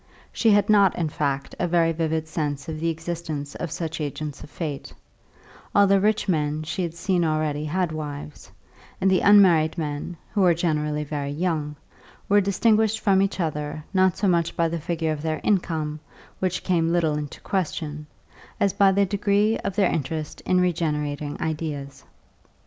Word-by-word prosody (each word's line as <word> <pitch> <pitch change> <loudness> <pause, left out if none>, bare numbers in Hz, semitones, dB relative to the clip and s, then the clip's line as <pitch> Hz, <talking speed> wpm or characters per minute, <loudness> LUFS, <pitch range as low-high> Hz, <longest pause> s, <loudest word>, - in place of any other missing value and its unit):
She 230 - +2
had 205 -1 +4
not, 200 -3 +5
in 165 -3 -1
fact, 140 -2 -2
a 175 - +1
very 165 -1 +3
vivid 160 -1 -1
sense 145 -3 -3
of 155 -1 -5
the 165 +1 0
existence 160 -3 -4
of 175 - -5
such 160 0 -4
agents 150 0 -5
of - - -11
fate; 150 - -5 0.8
all 205 - +7
the 195 0 +4
rich 215 +1 +1
men 155 -3 0
she 155 +4 -3
had 170 -2 -3
seen 180 0 0
already 155 -2 0
had 175 +2 -1
wives, 150 -1 -7 0.5
and 190 0 +3
the 185 - +4
unmarried 180 -6 +5
men, 150 +2 -4 0.2
who 205 - +1
were 175 -3 +5
generally 150 -3 -1
very 145 -1 -4
young, 150 -1 -2 0.5
were 205 +1 +5
distinguished 220 +2 +2
from 195 -3 +3
each 195 0 -1
other 150 -2 -3
not 185 -2 +3
so 205 - +1
much 170 -2 +1
by 170 - +3
the 165 +1 -3
figure 160 0 -2
of 150 -1 -3
their 155 0 -2
income, 160 -6 0 0.4
which 185 0 -1
came 165 -3 +1
little 170 -3 +2
into 150 -1 -5
question, 150 -5 -3 0.5
as 200 -2 +2
by 200 -1 +5
the 200 +1 +3
degree 205 +2 +1
of 190 - -4
their 200 -3 +3
interest 155 0 -3
in 185 - +3
regenerating 150 -4 -1
ideas. 150 -3 -4
165 Hz, 170 wpm, -24 LUFS, 150-185 Hz, 0.8 s, all